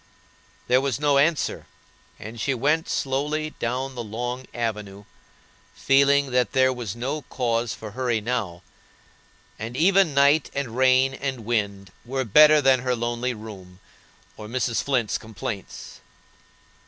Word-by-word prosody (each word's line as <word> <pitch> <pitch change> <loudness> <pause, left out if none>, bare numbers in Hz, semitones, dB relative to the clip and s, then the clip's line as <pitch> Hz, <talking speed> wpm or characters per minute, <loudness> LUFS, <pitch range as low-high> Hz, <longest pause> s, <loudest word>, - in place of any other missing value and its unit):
There 125 +1 +4
was 135 -1 -2
no 145 -2 +3
answer, 150 +2 0 0.5
and 110 +2 -8
she 135 +2 0
went 150 +6 0
slowly 150 +3 -1
down 130 +3 -2
the 120 -2 -5
long 120 +4 -5
avenue, 105 -4 -4 0.7
feeling 140 0 +3
that 125 -1 +1
there 130 0 +3
was 120 -5 -5
no 135 +6 -3
cause 115 -2 -1
for 110 -1 -9
hurry 120 -1 -1
now, 105 -7 -3 1.0
and 115 +3 -6
even 185 -2 +3
night 140 +2 +4
and 135 -5 -3
rain 130 +1 +4
and 130 -4 -5
wind 100 -4 -2
were 130 +2 -3
better 150 +7 +6
than 130 -1 +5
her 125 0 -1
lonely 120 +1 -2
room 95 -4 -11 0.6
or 105 - -8
Mrs. 120 0 -1
Flint's 125 -6 0
complaints. 105 -2 -7
125 Hz, 135 wpm, -24 LUFS, 115-140 Hz, 1.0 s, better